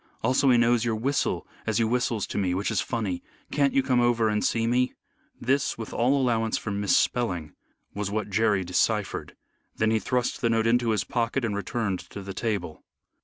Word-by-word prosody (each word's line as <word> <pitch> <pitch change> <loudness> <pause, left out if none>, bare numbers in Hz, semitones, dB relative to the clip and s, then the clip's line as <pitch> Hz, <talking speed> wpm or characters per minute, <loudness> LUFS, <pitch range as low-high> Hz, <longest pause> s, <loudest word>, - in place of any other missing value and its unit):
Also 130 +3 +3
he 125 - +6
knows 120 -1 +3
your 115 -2 0
whistle 135 +6 -1 0.2
as 110 -2 +1
you 115 -1 +2
whistles 120 -3 0
to - - -3
me, 90 -2 0
which 100 +3 -1
is 100 -4 +1
funny. 100 -6 -2 0.3
Can't 140 -2 +2
you 135 - +4
come 125 -2 +2
over 120 -2 +3
and 105 0 0
see 115 -1 +1
me?" 125 +2 +1 0.4
This, 135 +3 0
with 110 -1 -7
all 130 +4 +2
allowance 115 -4 +1
for 105 - -4
mis 100 0 +2
spelling, 90 -11 0 0.4
was 100 -1 -3
what 105 0 -3
Jerry 105 -2 +2
deciphered. 100 +4 -1 0.4
Then 110 0 +1
he 110 - +2
thrust 125 +3 -1
the 120 - +2
note 115 -1 +2
into 120 0 +2
his 105 -3 +1
pocket 120 +3 -1
and 105 -3 -2
returned 100 -1 -2
to 100 - -9
the 95 0 -6
table. 95 -6 -3
115 Hz, 200 wpm, -26 LUFS, 100-120 Hz, 0.4 s, he